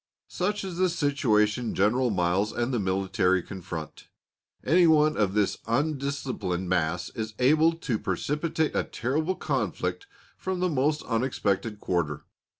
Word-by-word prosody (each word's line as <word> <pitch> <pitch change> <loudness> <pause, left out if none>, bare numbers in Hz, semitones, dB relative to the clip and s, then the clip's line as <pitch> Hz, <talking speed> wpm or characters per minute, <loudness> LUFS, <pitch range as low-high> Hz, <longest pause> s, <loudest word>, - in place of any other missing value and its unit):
Such 205 +3 -1
is 185 -3 -5
the 185 0 +3
situation 125 -8 +1
General 120 +6 +2
Miles 95 +1 +1
and 120 +2 -2
the 120 - +1
military 95 -1 +1
confront. 85 -5 -7 0.6
Any 175 +1 +5
one 155 -1 +4
of 100 -2 +1
this 105 -2 +1
undisciplined 135 - -1
mass 90 0 0
is 110 -2 -5
able 155 +6 +4
to 135 -9 -2
precipitate 150 - -1
a - - +2
terrible 155 +9 -1
conflict 400 - -2 0.3
from 185 -1 -3
the 180 0 +1
most 150 +1 +1
unexpected 110 -3 -1
quarter. 85 -7 -2
120 Hz, 135 wpm, -27 LUFS, 95-155 Hz, 0.6 s, Any